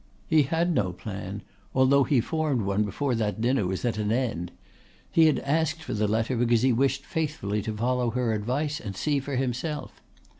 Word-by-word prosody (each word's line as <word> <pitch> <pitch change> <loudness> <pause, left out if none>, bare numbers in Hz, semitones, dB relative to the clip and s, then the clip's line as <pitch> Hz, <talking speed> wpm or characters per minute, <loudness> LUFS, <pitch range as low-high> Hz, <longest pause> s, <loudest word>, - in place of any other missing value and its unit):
He 160 -1 +4
had 165 +5 +1
no 90 - 0
plan, 95 +1 -6 0.3
although 130 +1 +5
he 135 -6 +3
formed 150 -4 0
one 100 +2 +1
before 130 +6 -1
that 110 -2 -1
dinner 120 -3 +1
was 95 +5 -3
at 115 -3 0
an 105 0 0
end. 115 -8 -1 0.6
He 160 -1 +6
had 155 - +3
asked 160 +2 0
for - - -4
the 105 0 +1
letter 110 +4 0
because 120 0 +2
he 130 -1 +4
wished 135 +3 +1
faithfully 145 -10 -2
to 105 +1 -4
follow 125 +1 +1
her 120 -1 0
advice 135 +8 -1
and 100 -2 -6
see 145 +3 +1
for 135 +1 -4
himself. 135 +4 -3
125 Hz, 190 wpm, -27 LUFS, 105-145 Hz, 0.6 s, He